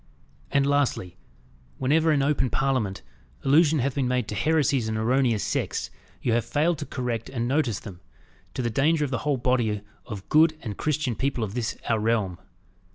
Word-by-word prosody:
And 140 Hz, -1 st, +2 dB
lastly, 140 Hz, -11 st, 0 dB, 0.6 s
whenever 155 Hz, +5 st, +3 dB
in 140 Hz, -2 st, +2 dB
open 140 Hz, -2 st, +1 dB
Parliament 115 Hz, -, -1 dB, 0.4 s
allusion 155 Hz, +3 st, +4 dB
hath 135 Hz, 0 st, 0 dB
been 135 Hz, -2 st, 0 dB
made 125 Hz, -2 st, 0 dB
to -, -, -3 dB
heresies 140 Hz, -1 st, +1 dB
and 110 Hz, -, -2 dB
erroneous 120 Hz, -1 st, +2 dB
sects, -, -, -2 dB, 0.3 s
you 120 Hz, -, +2 dB
have 120 Hz, 0 st, +2 dB
failed 155 Hz, +2 st, +1 dB
to 150 Hz, -, -5 dB
correct 120 Hz, -3 st, -3 dB
and 120 Hz, -2 st, -2 dB
notice 130 Hz, -6 st, 0 dB
them, 95 Hz, -5 st, -10 dB, 0.5 s
to 130 Hz, -, -2 dB
the 120 Hz, -, -1 dB
danger 150 Hz, +6 st, +2 dB
of 140 Hz, -, -6 dB
the 130 Hz, -, -1 dB
whole 145 Hz, -2 st, 0 dB
body 120 Hz, -4 st, +1 dB, 0.3 s
of 100 Hz, -4 st, -7 dB
good 155 Hz, +1 st, +4 dB
and 105 Hz, -5 st, -4 dB
Christian 150 Hz, -2 st, -1 dB
people 135 Hz, -2 st, -1 dB
of 100 Hz, -2 st, -4 dB
this 120 Hz, -1 st, -2 dB
our 115 Hz, -2 st, +2 dB
realm." 105 Hz, -6 st, 0 dB
130 Hz, 180 wpm, -26 LUFS, 115-145 Hz, 0.6 s, allusion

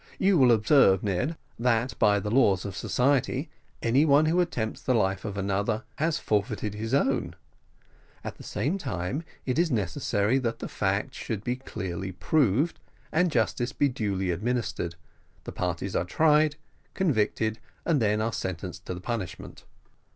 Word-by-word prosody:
You 195 Hz, 0 st, +3 dB
will 125 Hz, -2 st, +6 dB
observe, 110 Hz, -3 st, +5 dB
Ned, 105 Hz, -, -1 dB, 0.2 s
that 120 Hz, 0 st, +1 dB
by 105 Hz, -1 st, +4 dB
the 105 Hz, +1 st, -4 dB
laws 100 Hz, -7 st, +3 dB
of 100 Hz, -2 st, -5 dB
society, 135 Hz, -, +1 dB, 0.3 s
any 125 Hz, +5 st, +4 dB
one 150 Hz, 0 st, +5 dB
who 170 Hz, +3 st, +3 dB
attempts 115 Hz, -11 st, -2 dB
the 130 Hz, -, +1 dB
life 95 Hz, -3 st, +1 dB
of 100 Hz, -2 st, -4 dB
another 100 Hz, +3 st, -1 dB
has 155 Hz, 0 st, +1 dB
forfeited 105 Hz, -2 st, -1 dB
his 110 Hz, +2 st, -4 dB
own; 130 Hz, -10 st, +1 dB, 0.9 s
at -, -, -6 dB
the -, -, -10 dB
same 170 Hz, +9 st, -2 dB
time, 115 Hz, -, -3 dB
as 165 Hz, -, -10 dB, 0.2 s
it 130 Hz, +3 st, 0 dB
is 170 Hz, -1 st, +3 dB
necessary 105 Hz, -, 0 dB
that 115 Hz, -3 st, -2 dB
the -, -, -5 dB
fact 105 Hz, +7 st, -1 dB
should 110 Hz, -6 st, -4 dB
be 125 Hz, +2 st, -1 dB
clearly 95 Hz, -7 st, -5 dB
proved 140 Hz, -, +1 dB, 0.3 s
and 175 Hz, +3 st, +3 dB
justice 120 Hz, -1 st, 0 dB
be 145 Hz, -, +2 dB
duly 100 Hz, -6 st, -1 dB
administered, 105 Hz, -3 st, -2 dB, 0.5 s
the -, -, -6 dB
parties 90 Hz, +2 st, -3 dB
are -, -, +2 dB
tried, 150 Hz, -, +3 dB, 0.4 s
convicted, 110 Hz, -, +1 dB, 0.3 s
and 155 Hz, -6 st, +2 dB
then 105 Hz, 0 st, +2 dB
are 115 Hz, +1 st, -1 dB
sentenced 90 Hz, -2 st, -5 dB
to 90 Hz, -, -3 dB
the 90 Hz, -, -8 dB
punishment." 110 Hz, -5 st, -5 dB
115 Hz, 160 wpm, -27 LUFS, 100-135 Hz, 0.9 s, will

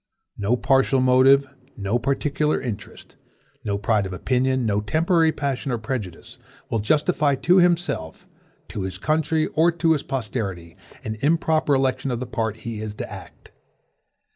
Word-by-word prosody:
No 105 Hz, +5 st, 0 dB
partial 135 Hz, +1 st, +2 dB
motive, 130 Hz, +2 st, +5 dB, 0.3 s
no 105 Hz, +3 st, -1 dB
particular 140 Hz, +3 st, 0 dB
interest, 110 Hz, -6 st, -8 dB, 0.5 s
no 100 Hz, -2 st, -1 dB
pride 105 Hz, -1 st, +1 dB
of 95 Hz, -, -7 dB
opinion, 130 Hz, +5 st, 0 dB
no 105 Hz, -1 st, +1 dB
temporary 160 Hz, -, +2 dB
passion 140 Hz, -3 st, -3 dB
or 120 Hz, -, 0 dB
prejudice, 110 Hz, -6 st, -6 dB, 0.3 s
will 115 Hz, -, +1 dB
justify 145 Hz, +4 st, +2 dB
to 160 Hz, +8 st, +3 dB
himself, 175 Hz, -, 0 dB, 0.4 s
to 100 Hz, -, -5 dB
his 95 Hz, -1 st, -4 dB
country, 155 Hz, +6 st, +1 dB
or 165 Hz, +2 st, +4 dB
to 165 Hz, -1 st, +1 dB
his 155 Hz, -3 st, +2 dB
posterity, 100 Hz, -11 st, -4 dB, 0.3 s
an 110 Hz, 0 st, -4 dB
improper 155 Hz, 0 st, +2 dB
election 130 Hz, 0 st, 0 dB
of 120 Hz, -2 st, -2 dB
the 130 Hz, -, -4 dB
part 110 Hz, -2 st, -3 dB
he 115 Hz, -2 st, -4 dB
is 105 Hz, -1 st, -5 dB
to -, -, -5 dB
act. -, -, -12 dB
130 Hz, 150 wpm, -23 LUFS, 110-150 Hz, 0.5 s, motive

